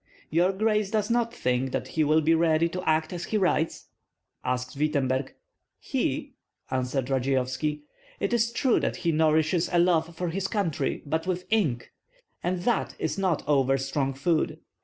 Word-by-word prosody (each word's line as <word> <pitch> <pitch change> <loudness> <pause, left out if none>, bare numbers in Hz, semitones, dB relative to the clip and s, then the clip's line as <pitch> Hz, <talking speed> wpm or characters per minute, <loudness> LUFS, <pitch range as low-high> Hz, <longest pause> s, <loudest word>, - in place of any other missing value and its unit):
"Your 175 +4 +3
grace 210 0 +1
does 215 0 0
not 235 -1 +1
think 125 - -1
that - - -2
he 160 - +1
will 155 +2 +4
be 160 +2 +3
ready 165 0 +3
to 180 +2 -4
act 155 +2 +1
as 175 - -4
he 215 - 0
writes?" 175 -5 0 0.5
asked 125 +1 -2
Wittemberg. 135 -3 0 0.4
"He?" - - -2 0.4
answered 130 +1 -1
Radzeyovski. 135 +3 0 0.4
"It 200 - -1
is 235 0 +2
true 240 +1 +2
that - - -1
he 170 -2 0
nourishes 160 +2 +2
a 175 - +2
love 170 -1 +2
for 175 +1 -2
his 195 +3 -2
country, 195 -9 -1
but 160 +4 -2
with 180 -1 -2
ink; 155 - +1 0.5
and 180 0 -2
that 240 - 0
is 160 +2 -2
not 185 -7 0
over 135 -2 +3
strong 135 0 -1
food. 155 +3 0
160 Hz, 165 wpm, -27 LUFS, 140-185 Hz, 0.5 s, will